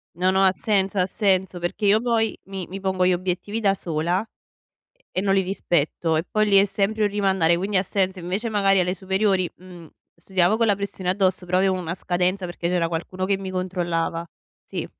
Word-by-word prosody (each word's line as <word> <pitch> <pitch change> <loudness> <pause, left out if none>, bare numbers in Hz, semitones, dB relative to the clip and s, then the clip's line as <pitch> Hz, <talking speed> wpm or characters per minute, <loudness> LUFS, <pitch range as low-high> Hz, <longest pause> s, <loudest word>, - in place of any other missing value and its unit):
No, 185 +2 +1
no, 190 0 +3
ha 190 - +5
senso, 195 -1 0
ha 180 - +3
senso. 190 -3 0
Perché 175 +4 -3
io 210 +3 +4
poi 230 -2 0
mi 190 -2 -6
mi 195 +2 -7
pongo 190 -1 +1
gli 185 - +4
obiettivi 185 +4 -2
da 195 -2 +3
sola 170 +2 -1
e 225 - -22 0.9
e 185 - +1
non 195 -1 +2
li 195 - +4
rispetto, 170 -3 0
e 160 - 0
poi 215 -1 +2
lì 200 -1 +5
è 200 - +5
sempre 210 +2 0
un - - +3
rimandare, 190 -4 +2
quindi 195 +2 0
ha - - +2
senso. 190 -1 -1
Invece 190 +6 -3
magari 195 -2 +3
alle 180 0 +1
superiori, 190 -1 0
mhmm, 180 -2 -13 0.3
studiavo 185 +4 +1
con 230 - +3
la 205 - +4
pressione 200 -2 -5
addosso 185 -1 +1
però 180 +1 0
avevo 190 0 +2
una 170 -1 -4
scadenza 180 +1 -1
perché 175 -1 -4
c'era 175 -2 +1
qualcuno 180 +3 -4
che 195 0 +1
mi 190 -1 -6
controllava. 175 -2 -2 0.4
Sì. - - -5
190 Hz, 210 wpm, -23 LUFS, 180-195 Hz, 0.9 s, ha